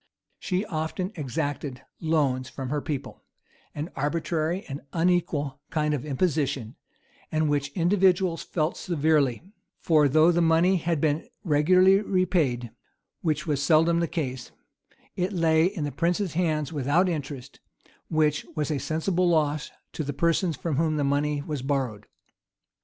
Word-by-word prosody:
She 185 +2 -1
often 165 +3 -3
exacted 145 - -4 0.2
loans 140 -6 0
from 135 -2 -6
her 150 -1 0
people; 145 -3 -5 0.5
an 150 +4 -4
arbitrary 160 +4 -1
and 140 +1 -6
unequal 165 -5 0
kind 150 -1 0
of 145 -2 -3
imposition, 140 -5 -1 0.6
and 155 0 +1
which 140 -1 0
individuals 180 -1 +2
felt 155 -1 -2
severely; 150 -7 +1 0.4
for 155 -3 +4
though 155 +5 +5
the 175 0 +2
money 165 +3 +4
had 165 -2 -1
been 155 +5 0 0.2
regularly 185 +4 +4
repaid, 170 - 0 0.5
which 155 -1 -1
was 145 -4 0
seldom 165 +3 +4
the 170 - +1
case,[*] 130 -7 -4 0.7
it 185 +3 -1
lay 160 -2 +3
in 185 -4 -2
the 145 - -2
prince's 175 +3 0
hands 160 -3 0
without 145 +6 +2
interest, 145 -5 -5 0.5
which 155 -2 +1
was 150 -1 -1
a 145 - -1
sensible 170 +5 0
loss 150 -2 +1 0.2
to 155 - -3
the 145 0 -4
persons 170 +2 +1
from 155 -4 -2
whom 155 -1 +1
the 145 - +1
money 145 +1 0
was 150 -3 -4
borrowed. 130 -6 -2
155 Hz, 140 wpm, -26 LUFS, 145-170 Hz, 0.7 s, though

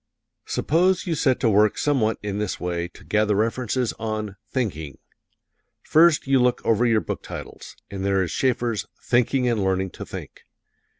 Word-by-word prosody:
Suppose 180 +4 +1
you 175 - -1
set 135 -4 +1
to 120 - +3
work 105 +1 +3
somewhat 125 -7 +1
in 105 0 -3
this 105 -3 -2
way 85 -1 -2
to - - -17
gather 105 -1 +1
references 115 +3 0
on 110 -2 -3
"Thinking:" 80 - -3 0.9
First 160 0 +4
you 135 -1 +3
look 125 0 +2
over 115 +2 +3
your 115 -2 +3
book - - -5
titles, - - -9 0.2
and 95 -1 -5
there 95 -1 +2
is 90 - -4
Schaeffer's 120 -4 0 0.2
"Thinking 125 +1 +2
and 115 -4 +1
Learning 95 -1 0
to - - -8
Think." - - -9
110 Hz, 165 wpm, -23 LUFS, 100-130 Hz, 0.9 s, First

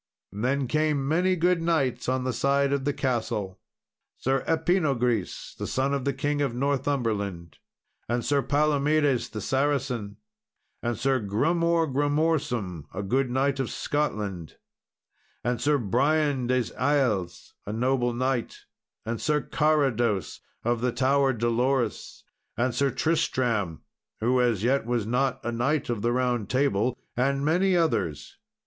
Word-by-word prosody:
Then 130 +6 0
came 150 -1 +1
many 180 +5 +2
good 175 0 +2
knights 135 -8 0
on 130 0 0
the 130 -1 -1
side 140 +3 +2
of 140 -2 -1
the 145 - +2
castle. 110 -8 -2 0.6
Sir 135 +1 0
Epinogris, 145 - 0
the - - -5
son 135 +2 0
of 140 -2 -2
the 140 - +2
King 145 +2 -1
of 135 -5 -1
Northumberland, 115 - -1 0.5
and 120 0 -1
Sir 145 -1 +2
Palomedes 145 -2 +2
the 110 - -6
Saracen, 130 -5 -1 0.6
and 120 -1 -2
Sir 135 +2 +1
Grummore 165 - +1
Grummorsum, 140 - 0
a 100 - -4
good 130 +6 +1
knight 135 +2 0
of 130 - -1
Scotland, 105 - -3 0.9
and 120 0 -1
Sir 150 0 +3
Brian 135 +3 +1
des 130 -1 0
Iles, 125 -10 0
a - - -2
noble 120 +2 +1
knight, 125 0 -2 0.4
and 115 0 -3
Sir 150 -1 +2
Carados 130 - +1 0.2
of 120 0 0
the 125 0 +1
Tower 135 +2 +2
Dolorous, 120 0 -1 0.3
and 125 +1 +1
Sir 140 +3 +2
Tristram, 125 - 0 0.4
who 125 +3 +2
as 115 -5 +1
yet 135 +3 +2
was 120 -3 0
not 125 +3 0
a 120 - -1
knight 120 +3 0
of 115 -4 -2
the 120 - +1
Round 125 -4 0
Table, 130 -3 +1 0.2
and 140 +3 +1
many 180 +4 +3
others. 105 - -1
130 Hz, 140 wpm, -26 LUFS, 115-145 Hz, 0.9 s, Sir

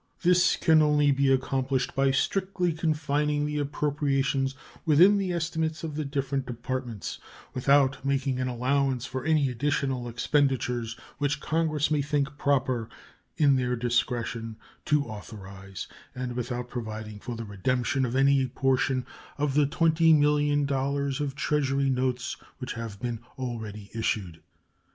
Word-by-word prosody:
This 175 0 +4
can 160 -2 +4
only 150 -1 +4
be 135 0 +3
accomplished 130 0 0
by 135 0 +2
strictly 180 +5 0
confining 150 -2 0
the 150 0 -2
appropriations 140 -2 0 0.3
within 180 +6 +6
the 190 -2 -1
estimates 160 -1 -2
of 160 -2 -4
the 155 +1 -2
different 140 -2 -2
Departments, 120 -2 -4 0.3
without 135 +1 +3
making 135 -1 0
an 130 - 0
allowance 130 +1 0
for 130 -2 -4
any 155 -2 +3
additional 135 -1 -1
expenditures 125 -2 0 0.2
which 145 0 0
Congress 155 -2 0
may 150 -2 +2
think 145 0 -1
proper, 130 -5 +1 0.5
in 140 -3 +4
their 125 -1 0
discretion, 120 -1 -1 0.3
to 150 -1 +2
authorize, 100 -3 -8 0.3
and 125 -1 -3
without 125 0 -3
providing 110 -3 -6
for 120 +2 -6
the 115 0 -6
redemption 125 +6 0
of 125 0 -1
any 135 0 +4
portion 130 0 +1 0.3
of 145 -1 0
the 145 0 +4
$20,000,000 145 -3 +2
of 140 -2 -2
Treasury 140 -2 +1
notes 125 -1 -1 0.2
which 130 -1 -5
have 115 -4 -6
been 120 -2 -3 0.2
already 110 -5 -6
issued. 100 -7 -2
135 Hz, 130 wpm, -27 LUFS, 125-145 Hz, 0.5 s, within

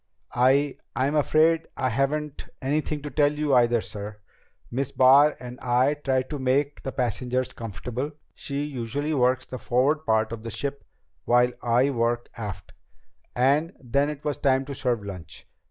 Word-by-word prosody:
"I 135 +3 +3 0.2
I'm 130 +4 +1
afraid 160 +2 +3
I 130 - +1
haven't 140 +4 -2
anything 150 +1 -1
to 145 - -5
tell 145 -1 +3
you 150 -1 -1
either, 120 -2 +4
sir. 105 0 -7 0.5
Miss 130 +2 -2
Barr 140 +3 +6
and 125 0 -9
I 125 +3 +2
tried 130 -3 -1
to 150 - -3
make 140 +3 0
the 135 - -4
passengers 125 +1 -1
comfortable 125 +6 -5 0.2
she 140 0 -4
usually 145 +2 -3
works 130 -1 +2
the 130 - -7
forward 140 +5 +1
part 110 0 +2
of 115 -1 -5
the 115 - -6
ship 140 +5 -4 0.4
while 125 +1 +4
I 125 +3 +2
work 120 -1 -1
aft 100 -5 -7 0.6
and 145 +7 +2
then 140 +3 0
it 150 0 -7
was 145 -2 -2
time 135 -1 +2
to 140 - -6
serve 125 -5 -1
lunch. 90 -6 -9
130 Hz, 160 wpm, -25 LUFS, 120-145 Hz, 0.6 s, Barr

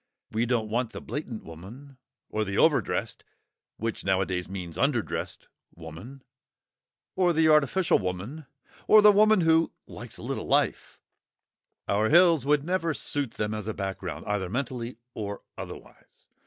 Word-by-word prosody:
We 115 +2 0
don't 115 -3 0
want 120 0 -1
the - - -6
blatant 130 -6 -6
woman, 115 - -12 0.3
or 110 - 0
the 100 -1 -3
overdressed - - +1 0.5
(which 115 0 -3
nowadays 95 -2 0
means 90 -4 -6
underdressed) 120 +2 -1 0.3
woman, 85 - -10 0.9
or 180 -2 +3
the 160 0 +3
artificial 155 +4 +4
woman, 100 - -5 0.4
or 215 -1 +7
the 210 - +9
woman 215 -1 +5
who 165 0 +3
"likes - - -9
a - - -11
little - - -4
life"; - - 0 0.9
our 105 +2 +2
hills 165 -4 +5
would 145 -1 +3
never 170 -2 -1
suit 140 -5 -2
them 105 0 -2
as 105 -1 -5
a 110 - -3
background, 95 -5 -5
either 100 -3 -2
mentally 125 0 -4 0.2
or 100 -1 -5
otherwise. - - -11
120 Hz, 140 wpm, -27 LUFS, 100-150 Hz, 0.9 s, the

